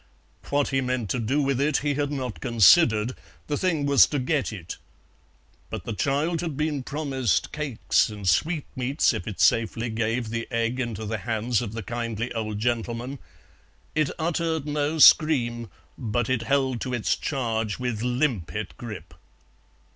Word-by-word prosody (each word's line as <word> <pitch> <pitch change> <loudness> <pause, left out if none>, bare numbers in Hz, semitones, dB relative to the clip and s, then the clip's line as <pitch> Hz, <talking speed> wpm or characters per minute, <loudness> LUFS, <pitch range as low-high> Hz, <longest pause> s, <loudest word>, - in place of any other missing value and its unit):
What 145 0 +1
he 135 0 +1
meant 125 -5 -2
to 125 - 0
do 135 +6 +1
with 135 -1 0
it 145 0 +2
he 145 - +2
had 145 0 -1
not 130 -5 -4
considered, 120 - +5 0.3
the 150 - -2
thing 160 -4 0
was 140 -1 +6
to 145 - -2
get 135 +1 0
it. 95 -6 -7 0.9
But - - -5
the 115 - -4
child 145 +8 0
had 160 -6 -4
been 150 -2 -1
promised 135 - -1
cakes 145 -9 +1
and 105 -3 -7
sweetmeats 135 - +1
if - - -5
it 105 - -6
safely 115 +1 +2
gave 115 +1 -1
the 115 0 -3
egg 115 +1 -1
into 115 -3 -3
the 110 +1 -3
hands 115 +2 -1
of 110 -3 -5
the 115 -1 -5
kindly 115 +1 -3
old 110 -2 -3
gentleman; 120 +3 -2 0.7
it 155 -3 +1
uttered 165 -2 -1
no 150 +1 -1
scream, 120 -8 +5 0.3
but 120 +2 -1
it 130 -3 +1
held 130 0 0
to 125 -1 -2
its 115 - +1
charge 115 -6 -2
with 125 -4 -3
limpet 120 - -1
grip. 95 -9 -8
125 Hz, 160 wpm, -25 LUFS, 115-145 Hz, 0.9 s, was